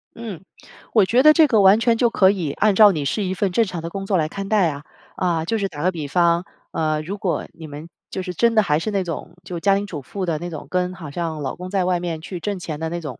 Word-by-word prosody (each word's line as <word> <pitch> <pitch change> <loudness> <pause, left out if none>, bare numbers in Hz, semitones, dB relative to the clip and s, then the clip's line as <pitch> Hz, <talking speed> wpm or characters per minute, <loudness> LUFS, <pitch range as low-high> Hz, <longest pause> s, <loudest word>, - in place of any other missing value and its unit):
嗯， 215 -7 -7 0.5
我 215 -4 +5
觉 235 +6 +3
得 305 +2 +8
这 320 0 +6
个 225 -6 +3
完 195 +2 +6
全 230 0 +3
就 240 0 +3
可 190 -4 +4
以 175 -8 -2
按 215 -1 +2
照 210 0 +8
你 150 -6 -3
是 170 +10 -1
一 185 -1 -1
份 195 0 -1
正 230 +6 +3
常 180 -4 -5
的 165 - -5
工 195 +3 -5
作 195 -1 +1
来 155 -2 +1
看 195 +4 -6
待 210 -5 +3
啊。 145 -1 -7 0.3
啊， 170 -3 0
就 225 +6 0
是 200 -2 -1
打 150 -6 -7
个 185 - +3
比 160 -5 -5
方， 170 +3 +2 0.3
呃， 155 -1 0
如 185 +6 -5
果 190 -3 -2
你 160 -1 -10
们 150 +3 -9 0.2
就 190 - -4
是 180 -1 -5
真 230 +6 +2
的 215 - +5
还 150 -5 +1
是 215 - -3
那 200 -2 0
种， 170 0 -6
就 175 -1 -6
家 195 +3 +3
庭 200 +1 -1
主 165 -7 -6
妇 190 +8 -5
的 165 -3 -1
那 175 - -5
种， 160 -4 -7
跟 180 0 0
好 165 -6 -9
像 160 -1 -3
老 140 - -3
公 180 +1 -7
在 190 -1 +1
外 180 -1 +1
面 170 -2 -4
去 180 +2 -6
挣 205 +3 -3
钱 160 -4 -6
的 160 - -2
那 170 +1 -4
种 145 -7 -7
180 Hz, 310 characters per minute, -21 LUFS, 165-200 Hz, 0.5 s, 得